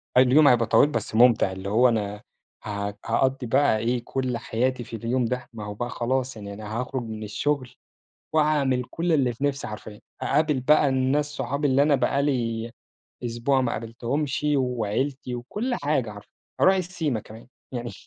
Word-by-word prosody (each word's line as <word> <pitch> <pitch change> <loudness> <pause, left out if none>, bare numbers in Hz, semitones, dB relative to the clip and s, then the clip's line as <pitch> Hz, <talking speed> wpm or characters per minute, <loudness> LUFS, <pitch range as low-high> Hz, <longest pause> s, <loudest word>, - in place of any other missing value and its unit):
طيب 130 0 +6
اليوم 145 +4 +6
هيبقى 120 -3 +5
طويل 145 - +4
بس 110 - -3
ممتع، 115 -5 +5
اللي 95 +1 -6
هُو 120 +4 +5
أنا 105 -2 -2 0.4
ه 100 -1 -3
هقَضي 135 -1 +1
بقى 130 -2 +3
إيه، 120 +2 0
كل 130 -3 -2
حياتي 125 +2 -1
في 115 - -8
اليوم 120 +3 0
ده، 125 +1 -3
ما 105 -2 -7
هو 105 - -5
بقى 120 +4 -4
خلاص 130 +1 -1
يعني 100 -2 -8
أنا 110 +2 -5
هاخرج 130 0 -3
من 110 -1 -6
الشغل، 130 +5 -1 0.6
وهاعمل 145 -5 +2
كل 170 0 -1
اللي 130 -5 +2
في 135 - -5
نفسي 140 -1 -1
حرفيًا. 105 0 -9 0.2
هاقابل 150 -2 +2
بقى 150 +2 +4
الناس 135 +3 +1
صُحابي 145 0 -2
اللي 135 +2 +4
أنا 150 0 +4
بقى 140 +2 +1
لي 115 -5 -1 0.6
أسبوع 120 +3 +1
ما 125 -2 0
قابلتهمش 120 +6 -3
وعيلتي 125 +1 -1
وكل 210 - -3
حاجة 145 - 0
حرفيًا، 105 -1 -13 0.3
هاروح 190 +1 +5
السيما 165 -9 -2
كمان 110 +3 -13 0.2
يعني 120 -1 -4
125 Hz, 175 wpm, -25 LUFS, 115-140 Hz, 0.6 s, طيب